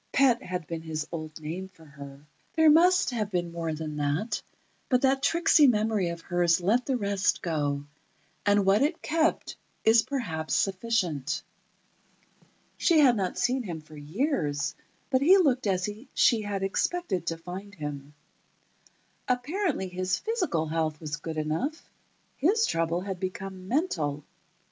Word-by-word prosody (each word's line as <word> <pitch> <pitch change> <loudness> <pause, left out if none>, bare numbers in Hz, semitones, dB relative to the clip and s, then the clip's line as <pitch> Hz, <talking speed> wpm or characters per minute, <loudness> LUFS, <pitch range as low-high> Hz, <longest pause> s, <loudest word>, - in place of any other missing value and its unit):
Pet 260 -2 +4
had 180 -6 -4
been 165 +1 -5
his 155 -1 -4
old 155 -2 -6
name 165 +5 -5
for 180 -4 -19
her. 140 -1 -12 0.3
There 320 -1 +6
must 355 +1 +5
have 215 -4 -2
been 175 -3 -2
more 165 -1 -3
than 155 -1 -5
that, 145 +10 -1 0.5
but 250 0 +2
that 270 0 +3
tricksy 310 0 +5
memory 215 -5 +2
of 170 0 -6
hers 175 -1 +2
let 220 +8 +1
the 265 -2 +1
rest 200 -3 0
go, 145 -4 -1 0.6
and 205 -1 +3
what 195 +4 +4
it 305 +4 0
kept 320 +1 0 0.3
is 225 +1 +6
perhaps 225 - -3
sufficient. 185 - 0 1.3
She 335 - +3
had 255 -4 +6
not 190 -4 -2
seen 255 +2 +1
him 175 -8 -5
for 155 0 -15
years, 150 - -1 0.4
but 260 -1 +3
he 360 +7 +7
looked 260 - +2
as 185 -1 +1 0.3
she 230 -3 +4
had 200 -2 -3
expected 195 - -1
to 165 - -1
find 185 +5 -8
him. 145 -2 -7 1.1
Apparently, 275 - -1
his 185 0 -1
physical 365 - -1
health 155 -1 -1
was 150 -2 -4
good 160 +1 -6
enough; 160 - -3 0.5
his 425 +9 +3
trouble 165 +1 0
had 190 -1 -5
become 185 0 -6
mental. 160 - -1
190 Hz, 150 wpm, -27 LUFS, 160-250 Hz, 1.3 s, he